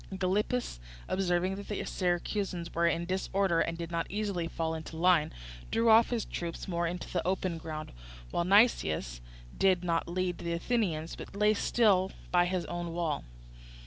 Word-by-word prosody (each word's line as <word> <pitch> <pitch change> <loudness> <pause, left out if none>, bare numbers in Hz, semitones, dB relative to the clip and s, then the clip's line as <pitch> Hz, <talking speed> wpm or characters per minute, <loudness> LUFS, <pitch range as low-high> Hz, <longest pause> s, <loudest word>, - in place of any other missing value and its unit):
Gylippus, 195 - -1 0.3
observing 185 0 0
that 200 - -8
the 210 - -3
Syracusans 180 0 -2
were 170 0 +2
in 170 +1 0
disorder 190 -1 +1
and 165 0 0
did 170 0 -5
not 170 0 -2
easily 200 -5 -2
fall 165 -1 -2
into 160 0 -6
line, 170 -2 +4 0.4
drew 230 0 +3
off 225 +1 +7
his 235 -3 -1
troops 170 -1 -5
more 170 -2 0
into 175 +1 -4
the 175 - -1
open 185 -2 -1
ground, 155 -1 -6 0.4
while 170 - +1
Nicias 170 - +3 0.3
did 185 -2 +3
not 170 -2 0
lead 180 0 -2
on - - -8
the 170 - 0
Athenians 170 -5 -1
but - - -10
lay 210 +1 +4
still 200 -3 +3 0.2
by 175 -1 +4
his 180 0 -1
own 175 -1 -4
wall. 165 -4 -1
180 Hz, 170 wpm, -30 LUFS, 170-195 Hz, 0.4 s, off